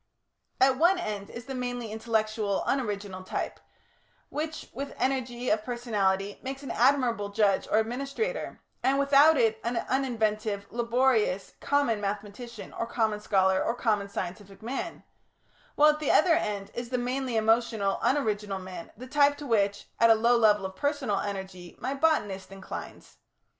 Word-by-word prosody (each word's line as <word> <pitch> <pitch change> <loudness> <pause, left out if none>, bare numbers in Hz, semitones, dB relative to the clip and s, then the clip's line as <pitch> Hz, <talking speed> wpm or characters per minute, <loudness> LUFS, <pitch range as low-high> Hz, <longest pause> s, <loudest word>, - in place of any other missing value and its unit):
At 260 0 +4
one 350 +4 +5
end 210 - -4
is 235 0 -8
the 270 - -6
mainly 245 -3 -4
intellectual, 215 -2 -1
unoriginal 205 -7 -2
type, - - -4 0.7
which, 310 +1 -4
with 275 +3 -6
energy 250 -2 -1
of 210 0 +1
personality, 205 -5 -1
makes 270 +1 -6
an 275 - -5
admirable 240 -5 +2
judge 200 -1 +2
or - - +2
administrator 275 - -2 0.2
and 270 +1 +2
without 280 +3 +6
it 225 -3 +2
an 235 +1 -1
uninventive, 215 -6 -1
laborious, 235 -4 +1
common 285 -7 +1
mathematician, 210 +3 -5
or 230 - -3
common 220 -3 0
scholar, 190 -2 +2
or 230 - 0
common 210 -5 0
scientific 195 +1 -6
man; 250 +4 -4 0.7
while 300 +1 +7
at 300 - -5
the 305 - -2
other 335 +1 +5
end 205 -10 -1
is 240 0 -5
the 250 - 0
mainly 250 0 -1
emotional, 220 -2 +2
unoriginal 210 -7 0
man, 185 -2 -8
the 250 - -8
type 285 +2 +3
to 295 - -8
which 205 -5 +1
at 230 - +6
a 225 - +8
low 235 +2 +3
level 210 -4 +4
of 190 0 -6
personal 280 -6 0
energy 190 -3 -6
my 260 - -2
botanist 240 -12 0
inclines. 195 -1 -9
230 Hz, 155 wpm, -28 LUFS, 205-265 Hz, 0.7 s, a